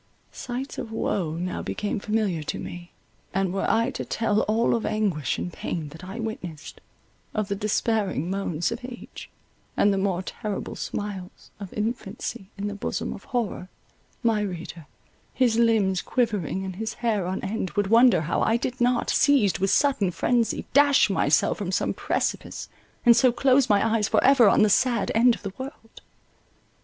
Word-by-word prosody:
Sights 260 +2 -5
of 225 - -6
woe 185 -7 -1
now 180 +2 -3
became 210 0 -3
familiar 210 -6 -1
to 150 - -4
me, 175 0 -8 0.4
and 190 -2 +1
were 195 - -1
I 230 +3 +2
to - - -5
tell 215 -2 0
all 225 +2 +2
of 230 - 0
anguish 195 -9 0
and 175 - -4
pain 155 -3 -4
that 160 +5 -12
I 190 +5 -7
witnessed, 180 -9 -6 0.5
of 215 -1 -1
the 200 - 0
despairing 210 - 0
moans 180 -3 -1
of 230 - -4
age, 245 -1 -9 0.5
and 205 0 +4
the 195 - 0
more 190 -2 0
terrible 210 +1 -5
smiles 200 -3 -6
of 200 -3 -8
infancy 215 -2 -4
in 200 - -4
the 205 - -3
bosom 205 - -3
of - - -11
horror, 215 -6 -3 0.5
my 225 -2 +2
reader, 175 -5 -6 0.5
his 235 -3 +2
limbs 210 -6 +3
quivering 205 - -1
and 185 -1 -6
his 220 +1 -4
hair 210 -6 +1
on 190 +1 -2
end, 195 -1 -2
would 205 - +1
wonder 235 -5 +6
how 155 - -1
I 225 - +3
did 250 +1 -4
not, 245 0 +2
seized 225 - +3
with 195 +1 +1
sudden 265 -9 +2
frenzy, 235 +5 0
dash 285 0 +5
myself - - +2
from - - -3
some - - 0
precipice, - - -2 0.4
and 235 -1 +8
so 255 0 +5
close 260 +1 +3
my 205 +1 +4
eyes 220 -2 +1
for - - +2
ever 255 -5 +6
on 215 - +4
the 215 - +4
sad 240 -1 +2
end 235 +1 +5
of - - -15
the 195 -2 -5
world. 260 -4 -9
210 Hz, 175 wpm, -25 LUFS, 190-235 Hz, 0.5 s, and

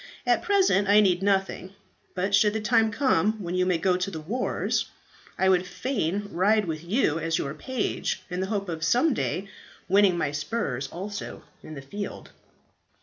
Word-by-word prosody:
"At - - +3
present 385 - +3
I 205 +1 +7
need 185 -3 +3
nothing, 195 -1 -1 0.4
but 195 +2 -1
should 205 +1 +4
the 220 - -1
time 225 0 +3
come 215 - +2
when 185 -5 -6
you 185 0 +1
may 180 -2 +2
go 180 +1 +1
to 180 +2 -2
the 165 -5 -6
wars, 220 +12 -1 0.5
I 190 - +2
would 185 -1 +3
fain 200 -1 -2
ride 205 +4 +2
with 160 -2 -4
you 170 - +1
as 165 0 0
your 140 - -3
page, 245 +9 -3
in 180 0 -4
the 190 - -1
hope 200 -2 -2
of 160 -2 -4
some 250 - +3
day 195 -4 -2 0.4
winning 195 -1 +4
my 145 -4 -1
spurs 145 - -3
also 200 +7 -7 0.2
in 155 - -10
the 135 - -8
field." 200 +9 -7
190 Hz, 180 wpm, -26 LUFS, 170-210 Hz, 0.5 s, I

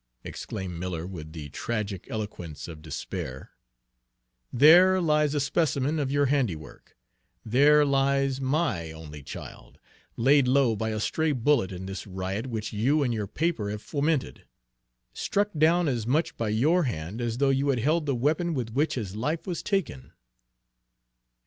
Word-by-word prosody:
exclaimed 90 -3 -6
Miller, 85 -2 -4
with 80 -4 -8
the 80 -3 -7
tragic 105 +3 -4
eloquence 95 -8 -6
of 80 -3 -9
despair, 70 -3 -6 1.0
"there 175 +8 +7
lies 150 -3 +2
a - - +2
specimen 140 +1 0
of 135 -2 -1
your 145 0 +3
handiwork! 120 - -2 0.5
There 145 +6 +5
lies 135 -1 +1
my 130 - 0
only 75 -2 -10
child, 70 - -10 0.4
laid 135 +2 +4
low 130 -3 +3
by 110 +1 -2
a 110 -1 -2
stray 160 +7 0
bullet 125 -5 +2
in 95 0 -6
this 95 +1 -6
riot 95 +4 -4
which 110 -3 -4
you 135 +8 +2
and 125 -3 0
your 105 -3 -2
paper 155 - -1
have 105 0 -5
fomented; 145 - -1 0.7
struck 205 +1 0
down 165 +3 +3
as 120 -5 -1
much 150 +7 +1
by 115 -2 -2
your 150 +11 +2
hand 100 0 -4
as 120 -1 -2
though 140 +1 +3
you 135 +1 +1
had 135 - +2
held 155 +6 +1
the 140 - +1
weapon 155 +6 0
with 120 -4 -3
which 145 +7 0
his 105 -6 -4
life 150 +9 -2
was 180 -3 -3
taken!" 75 - -2
125 Hz, 155 wpm, -27 LUFS, 100-150 Hz, 1.0 s, there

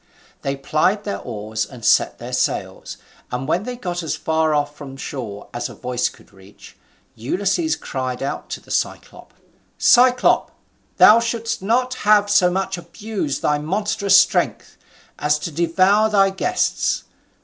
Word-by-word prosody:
They 135 0 -2
plied 155 +9 0
their 205 - -4
oars, 110 -1 -4
and 115 +2 -9
set - - +3
their - - -8
sails, - - -2 0.3
and 125 +2 -3
when 180 +6 0
they 250 0 -4
were 245 - -18
got 175 -1 -3
as 160 - -3
far 160 -1 0
off 145 0 -1
from 135 -2 -10
shore 115 -8 -7
as 120 0 -3
a - - -11
voice 125 0 -1
could - - -20
reach, 95 +1 -16 0.4
Ulysses 195 - -1
cried 130 -1 -4
out 135 - -4
to - - -5
the - - -15
Cyclop: - - -4 0.5
"Cyclop, 250 0 +4 0.5
thou 220 +2 +8
shouldst 230 -2 -3
not 250 +5 +1
have 205 -1 +4
so 185 -3 +5
much 190 0 -2
abused 200 -7 -5
thy 150 0 +1
monstrous 200 +4 +2
strength, - - 0 0.4
as 150 0 +2
to 165 - -6
devour 185 +7 +3
thy 195 -2 +3
guests. 360 - 0
175 Hz, 155 wpm, -20 LUFS, 135-210 Hz, 0.5 s, thou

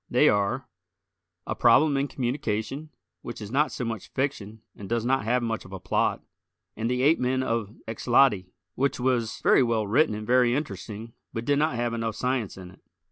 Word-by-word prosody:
They - - +5
are: 105 +5 0 0.8
"A - - -2
Problem 135 +5 +4
in 135 +1 +1
Communication," 130 +2 -3 0.3
which 120 - -7
is 105 -1 -7
not 145 +4 +2
so 125 - -4
much 115 -3 -4
fiction 110 -6 -3
and 100 - -9
does 115 0 0
not 135 -3 +1
have 125 +2 +1
much 115 -1 -2
of 95 - -14
a 95 - -5
plot, 90 0 0 0.5
and 115 +1 -2
"The 125 +1 0
Ape 155 +4 +4
men 130 +1 +1
of 115 -3 -2
Xloti," 115 -3 +3 0.3
which 135 +5 0
was 125 -3 0
very - - +5
well 115 -3 +1
written 115 +2 +2
and 105 0 -6
very 125 +1 +3
interesting, 110 -4 -5 0.2
but 115 +1 -4
did 145 +1 +2
not 155 -3 +1
have 120 -1 -1
enough 115 -2 -2
science 125 -6 -2
in 90 -1 -10
it. 95 - -20
120 Hz, 190 wpm, -26 LUFS, 110-130 Hz, 0.8 s, They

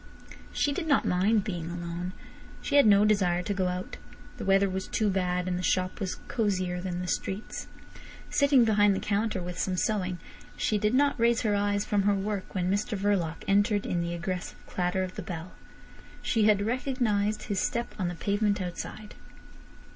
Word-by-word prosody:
She 290 - +1
did 325 +2 -3
not 285 - +3
mind 200 +4 +2
being 175 -5 -4
alone. 175 +1 -5 0.5
She - - -5
had 285 -5 +7
no 205 0 +6
desire 180 -4 +2
to 205 - -1
go 190 -2 0
out. 180 +1 -4 0.4
The - - -5
weather 195 0 +4
was 190 0 -3
too 215 -2 +1
bad, 180 -1 0
and 180 -1 -1
the - - -2
shop 185 0 0
was 190 -3 -2
cosier 185 -5 -1
than 180 -1 -3
the 180 - -4
streets. 195 +3 -3 0.6
Sitting 280 -4 +4
behind 205 -2 +4
the - - -1
counter 205 -2 -1
with 180 0 -6
some 185 -1 -1
sewing, 185 -3 0 0.4
she 210 - +1
did 210 +4 +1
not 285 -1 +3
raise 235 0 +3
her 215 -3 +1
eyes 205 0 +1
from 205 -1 +1
her 200 +1 +3
work 200 0 -3
when 180 0 0
Mr 210 +2 -1
Verloc 190 -5 0
entered 205 +1 +2
in 175 - -1
the 170 0 -2
aggressive 180 +1 -4
clatter 180 +1 -1
of 185 0 -5
the - - -6
bell. 175 0 -6 0.7
She 220 -3 +2
had 205 -1 +4
recognised 225 -4 0
his 200 -3 -2
step 235 +4 -1
on 185 - 0
the 175 - -3
pavement 205 +3 0
outside. 190 +3 -6
200 Hz, 185 wpm, -28 LUFS, 180-210 Hz, 0.7 s, had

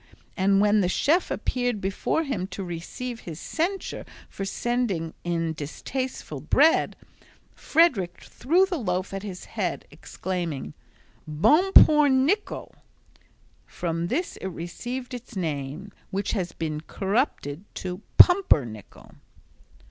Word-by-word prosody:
and 195 0 +3
when 210 +1 +4
the 180 - +1
chef 315 - +2
appeared 245 -3 -1
before 195 +11 -1
him 210 - -3
to 195 +1 -6
receive 185 +8 -6
his 165 -6 -8
censure 360 - -2 0.3
for 195 - -5
sending 200 -6 -1
in 165 -2 -1
distasteful 155 - -5
bread, 285 - +3 0.6
Frederick 260 - +2
threw 340 +9 +2
the 365 -4 -3
loaf 185 -3 -2
at 195 - -3
his 190 -3 -7
head, - - -3
exclaiming, 170 - -5 0.5
"Bon 300 - +3
pour 300 -1 +8
Nichol." 285 +11 0 0.9
From 170 -1 -3
this 330 - -2
it - - -5
received 240 +9 -6
its 245 -2 -8
name 155 +2 -4 0.2
which 200 +1 -2
has 180 -5 -2
become 155 -2 -4
corrupted 195 - -1
to 180 +1 -5 0.2
"pumpernickel." 140 - +4
195 Hz, 120 wpm, -25 LUFS, 170-260 Hz, 0.9 s, pour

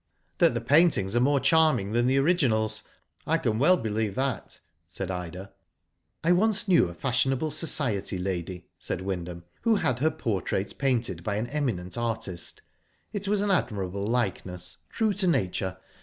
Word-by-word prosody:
'^That 120 - +4
the 120 - -1
paintings 130 - +3
are - - +4
more 140 +3 +3
charming 145 -7 +3
than 120 +2 +2
the 130 +1 +3
originals, 115 -9 +2 0.4
I - - +3
can 110 0 -1
well 180 +7 +5
believe 110 - -2
that," 130 -3 -3 0.3
said 95 +2 -5
Ida. 90 +1 -6 0.7
''I 165 - +3
once 210 +3 +3
knew 175 - +5
a - - -8
fashionable 135 - 0
Society 145 - -1
lady,"* 90 -1 -4
said - - -3
Wyndham, 90 -2 -4 0.2
"who 230 -1 +3
had 130 - 0
her 155 +4 +3
portrait 100 - -2
painted 120 -10 0
by 100 +1 -1
an 110 +3 -1
eminent 120 -8 -3
artist. 110 -7 -4 0.5
It 200 -1 -3
was 205 0 +2
an 205 -1 +1
admirable 100 - -1
likeness, 95 -5 -2
true 220 -2 +1
to 195 -2 +2
nature. 95 - 0
115 Hz, 155 wpm, -27 LUFS, 95-150 Hz, 0.7 s, well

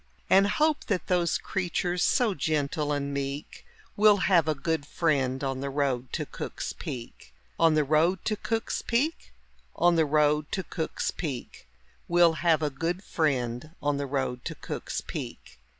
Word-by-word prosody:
And 195 +1 +6
hope 300 +8 +1
that 200 -5 -1
those 175 -2 +2
creatures, 180 -1 -2
so 240 -2 +3
gentle 150 -1 -1
and 140 -1 -1
meek, 140 +1 -5 0.3
Will 210 0 +6
have 180 -4 +3
a 155 - +1
good 160 +1 -1
friend 135 -6 0
on 135 -1 -2
the 140 +1 -3
road 135 -3 -1
to - - -1
Cook's - - -5
Peak. 115 - -8 0.2
On 165 -2 +5
the 155 - +4
road 160 +5 +2
to 215 - +1
Cook's 225 +2 -2
Peak, 280 +8 -1 0.4
On 175 0 +4
the 160 - +4
road 150 0 +2
to 190 - -1
Cook's 160 -3 -3
Peak, 135 - -6 0.4
Will 170 -1 +5
have 165 -2 +3
a 150 - 0
good 170 +7 -2
friend 140 -2 -1
on 145 -1 0
the 140 0 -2
road 130 -2 -2
to - - -4
Cook's - - -5
Peak. - - -7
155 Hz, 165 wpm, -28 LUFS, 140-180 Hz, 0.4 s, And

